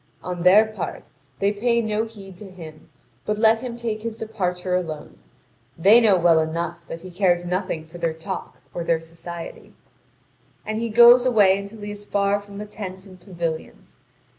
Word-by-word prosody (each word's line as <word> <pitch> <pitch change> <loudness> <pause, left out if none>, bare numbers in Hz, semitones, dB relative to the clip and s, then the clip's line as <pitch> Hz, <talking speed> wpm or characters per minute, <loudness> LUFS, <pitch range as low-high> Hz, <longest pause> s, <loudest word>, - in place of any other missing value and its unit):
On 180 -1 -4
their 190 +5 +7
part, 215 0 -6 0.3
they 200 +1 +1
pay 235 +3 +1
no 220 -1 -1
heed 200 -4 -12
to 205 - -10
him, 160 -4 -12 0.3
but 210 0 -2
let 220 +1 +4
him 240 -1 -6
take 225 -2 -3
his 225 0 -5
departure 185 -5 -3
alone. 160 - -5 0.6
They 205 +8 +6
know 215 -4 +5
well 170 -2 +4
enough 160 +2 -2
that 165 - -7
he 185 +1 -10
cares 175 -1 +1
nothing 175 -3 -2
for 170 +2 -12
their 165 -1 0
talk 165 +4 -7 0.2
or 175 - -3
their 165 -1 +1
society. 165 +1 -9 0.9
And 215 0 -2
he 230 0 -2
goes 240 +2 +8
away 210 -7 +5
until 200 +2 -9
he 205 0 -5
is 205 0 -9
far 200 0 +1
from 200 0 -12
the 210 - -5
tents 190 -2 -8
and 185 -2 -15
pavilions. 170 -4 -6
195 Hz, 180 wpm, -23 LUFS, 175-215 Hz, 0.9 s, goes